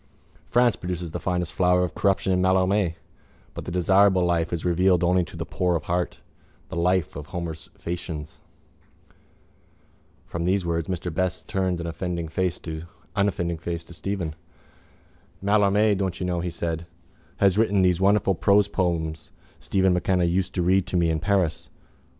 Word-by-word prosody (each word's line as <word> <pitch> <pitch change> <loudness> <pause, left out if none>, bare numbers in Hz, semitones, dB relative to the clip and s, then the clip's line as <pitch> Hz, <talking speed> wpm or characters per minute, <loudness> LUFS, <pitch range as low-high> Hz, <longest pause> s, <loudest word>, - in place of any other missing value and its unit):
France 120 -1 +4
produces 90 -2 -5
the - - -4
finest 90 -2 -2
flower 90 0 +3
of 90 - -2
corruption 95 -1 +1
in 90 - +2
Mallarmé 95 -1 +2 0.6
but - - -7
the - - -5
desirable 95 +1 +4
life 85 -1 +1
is 85 -1 -3
revealed 90 0 +3
only 90 +1 +3
to - - -10
the - - -3
poor 90 -1 0
of 85 - -2
heart, 90 0 -2 0.5
the - - -6
life 90 0 +1
of 75 0 -7
Homer's 80 -2 -6
Phæacians. 80 -3 -6 1.9
From 85 - -4
these 95 +1 +1
words 85 0 -1
Mr 90 -2 -3
Best 90 +2 -2
turned 95 -2 -1
an 85 - -4
unoffending 85 0 -3
face 90 +2 -1
to 85 0 -3
Stephen. 90 -3 -3 1.1
—Mallarmé, 105 +1 +3
don't 95 -2 -2
you 90 - -2
know, 90 -1 -1
he 90 +1 -2
said, 85 0 -4 0.5
has 100 0 +3
written 100 -4 +3
those 90 -1 +2
wonderful 100 0 +3
prose 100 +3 +3
poems 85 -5 -2 0.3
Stephen 95 -1 +2
MacKenna 90 0 +1
used 90 +2 0
to 90 - +1
read 95 +1 +3
to 90 - 0
me 85 -1 +2
in 80 - 0
Paris. 95 -1 0
90 Hz, 155 wpm, -25 LUFS, 85-95 Hz, 1.9 s, France